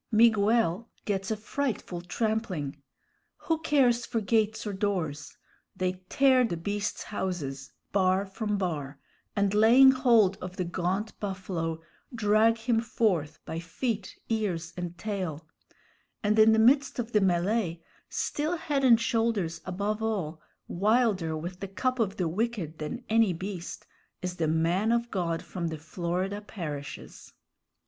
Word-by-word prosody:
Miguel 225 Hz, -2 st, +3 dB, 0.2 s
gets 195 Hz, -2 st, -1 dB
a 220 Hz, -, -1 dB
frightful 215 Hz, -6 st, -3 dB
trampling. 180 Hz, -8 st, -2 dB, 0.6 s
Who 325 Hz, -1 st, -1 dB
cares 250 Hz, -6 st, +3 dB
for 230 Hz, -, -1 dB
gates 220 Hz, 0 st, +1 dB
or 205 Hz, -, -3 dB
doors? 175 Hz, -8 st, -2 dB, 0.4 s
They 185 Hz, 0 st, -2 dB
tear 265 Hz, -2 st, +5 dB
the 200 Hz, -8 st, -1 dB
beasts' 205 Hz, +5 st, -3 dB
houses 150 Hz, -10 st, -4 dB, 0.2 s
bar 190 Hz, 0 st, +2 dB
from 205 Hz, +1 st, -2 dB
bar, 150 Hz, -7 st, -3 dB, 0.4 s
and, 200 Hz, -1 st, +2 dB
laying 235 Hz, +6 st, +7 dB
hold 235 Hz, -7 st, +4 dB
of 180 Hz, 0 st, -7 dB
the 185 Hz, -, 0 dB
gaunt 185 Hz, +5 st, -2 dB
buffalo, 180 Hz, -5 st, -3 dB, 0.3 s
drag 220 Hz, +1 st, +4 dB
him 225 Hz, 0 st, +1 dB
forth 195 Hz, -10 st, -1 dB
by 160 Hz, -, -4 dB
feet, 200 Hz, +4 st, -3 dB
ears, 190 Hz, -7 st, -2 dB
and 175 Hz, -1 st, -5 dB
tail; 185 Hz, -7 st, -4 dB, 0.8 s
and 210 Hz, +1 st, +2 dB
in 220 Hz, +1 st, +8 dB
the 220 Hz, -, +4 dB
midst 260 Hz, +5 st, +4 dB
of 240 Hz, -1 st, -3 dB
the 210 Hz, -, +4 dB
mêlée, 180 Hz, -1 st, +1 dB, 0.3 s
still 310 Hz, +4 st, -1 dB
head 285 Hz, -4 st, -1 dB
and 235 Hz, -3 st, +7 dB
shoulders 225 Hz, -8 st, 0 dB
above 205 Hz, +4 st, -2 dB
all, 185 Hz, -8 st, -2 dB, 0.3 s
wilder, 200 Hz, -5 st, +1 dB
with 175 Hz, +3 st, -6 dB
the 195 Hz, -, -4 dB
cup 255 Hz, +6 st, -1 dB
of 200 Hz, -4 st, 0 dB
the 180 Hz, -, 0 dB
wicked, 185 Hz, -3 st, -2 dB
than 155 Hz, -, -5 dB
any 220 Hz, -4 st, +3 dB
beast, 185 Hz, 0 st, -6 dB, 0.4 s
is 180 Hz, 0 st, -3 dB
the 160 Hz, -, +1 dB
man 170 Hz, +7 st, +2 dB
of 235 Hz, 0 st, 0 dB
God 170 Hz, -4 st, -1 dB
from 175 Hz, -3 st, -4 dB
the 160 Hz, -1 st, -4 dB
Florida 180 Hz, +5 st, -3 dB
parishes! 145 Hz, -, -7 dB
200 Hz, 140 wpm, -28 LUFS, 170-225 Hz, 0.8 s, in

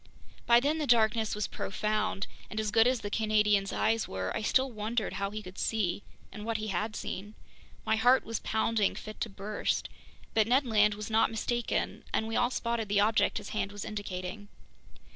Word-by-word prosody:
By 235 Hz, 0 st, +7 dB
then 295 Hz, +5 st, 0 dB
the 300 Hz, -, -1 dB
darkness 220 Hz, -2 st, +3 dB
was 210 Hz, -1 st, -1 dB
profound, 215 Hz, 0 st, -1 dB, 0.2 s
and 215 Hz, -, -4 dB
as 215 Hz, -1 st, -1 dB
good 225 Hz, +2 st, +5 dB
as 255 Hz, -2 st, +1 dB
the 205 Hz, -, -5 dB
Canadian's 210 Hz, -2 st, +2 dB
eyes 225 Hz, 0 st, +1 dB
were, 95 Hz, -1 st, -3 dB
I -, -, -1 dB
still 260 Hz, +4 st, +2 dB
wondered 215 Hz, 0 st, -2 dB
how 200 Hz, 0 st, -2 dB
he 215 Hz, +1 st, -6 dB
could 185 Hz, 0 st, -10 dB
see—and 210 Hz, 0 st, -3 dB
what 225 Hz, 0 st, -1 dB
he 215 Hz, 0 st, -4 dB
had 210 Hz, +3 st, -2 dB
seen. 205 Hz, +3 st, -5 dB, 0.5 s
My 220 Hz, -, +2 dB
heart 245 Hz, +4 st, +4 dB
was 225 Hz, -1 st, -3 dB
pounding 220 Hz, -1 st, +1 dB
fit 215 Hz, 0 st, -9 dB
to 230 Hz, -, -1 dB
burst. 200 Hz, +1 st, -2 dB, 0.4 s
But 220 Hz, -1 st, +3 dB
Ned 260 Hz, +4 st, +3 dB
Land 210 Hz, -3 st, +3 dB
was 210 Hz, +1 st, -6 dB
not 220 Hz, +1 st, +4 dB
mistaken, 235 Hz, +2 st, -2 dB
and 220 Hz, -, 0 dB
we 225 Hz, -, -3 dB
all 245 Hz, -, +3 dB
spotted 235 Hz, -4 st, -2 dB
the 200 Hz, 0 st, +3 dB
object 215 Hz, +2 st, +3 dB
his 205 Hz, -2 st, -6 dB
hand 210 Hz, -2 st, -2 dB
was 205 Hz, -1 st, -6 dB
indicating. 205 Hz, -1 st, -5 dB
215 Hz, 190 wpm, -30 LUFS, 205-225 Hz, 0.5 s, By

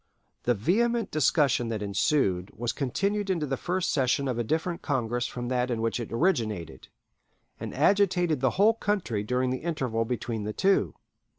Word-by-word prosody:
The 120 Hz, -, +3 dB
vehement 230 Hz, -, +1 dB
discussion 145 Hz, -4 st, +2 dB
that 110 Hz, -2 st, -3 dB
ensued 100 Hz, -3 st, +1 dB
was 120 Hz, 0 st, -1 dB
continued 200 Hz, -, -1 dB
into 170 Hz, -5 st, 0 dB
the 135 Hz, -1 st, -1 dB
first 180 Hz, +5 st, -1 dB
session 135 Hz, 0 st, +1 dB
of 125 Hz, -2 st, -2 dB
a -, -, +1 dB
different 160 Hz, +7 st, -2 dB
Congress 120 Hz, -4 st, -1 dB
from 120 Hz, -1 st, -5 dB
that 125 Hz, 0 st, 0 dB
in 120 Hz, -2 st, -1 dB
which 115 Hz, +1 st, -1 dB
it 120 Hz, -, -6 dB
originated, 110 Hz, -, -1 dB, 0.7 s
and -, -, -5 dB
agitated 180 Hz, -6 st, +2 dB
the 130 Hz, -, +3 dB
whole 210 Hz, +4 st, +5 dB
country 195 Hz, -, -1 dB
during 125 Hz, +3 st, 0 dB
the 130 Hz, -, -2 dB
interval 130 Hz, -9 st, -1 dB
between 115 Hz, -2 st, -3 dB
the 105 Hz, +1 st, -3 dB
two. 195 Hz, -, +2 dB
130 Hz, 170 wpm, -27 LUFS, 115-175 Hz, 0.7 s, whole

